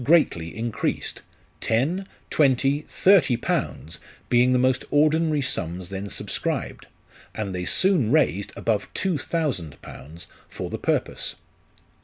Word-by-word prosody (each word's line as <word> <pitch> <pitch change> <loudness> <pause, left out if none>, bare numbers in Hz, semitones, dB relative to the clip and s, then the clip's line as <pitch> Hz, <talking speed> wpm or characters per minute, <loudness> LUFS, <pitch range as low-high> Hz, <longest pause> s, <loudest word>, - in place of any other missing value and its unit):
greatly 120 - +2
increased 115 -1 -2 0.4
ten, 155 +13 0 0.2
twenty, 140 0 +3
thirty 185 -11 +4
pounds, 80 -6 -3 0.3
being 125 +1 +4
the 125 - +4
most 130 0 +2
ordinary 155 0 +3
sums 90 -7 -2
then 100 +1 -5
subscribed, - - -3 0.5
and 105 -3 -3
they 90 -1 -3
soon 170 - +2
raised 100 - +2
above 110 -3 -1
two 185 -6 0
thousand 130 - -2
pounds 80 +5 -10 0.2
for - - -6
the - - -4
purpose. - - -1
125 Hz, 120 wpm, -24 LUFS, 95-155 Hz, 0.5 s, thirty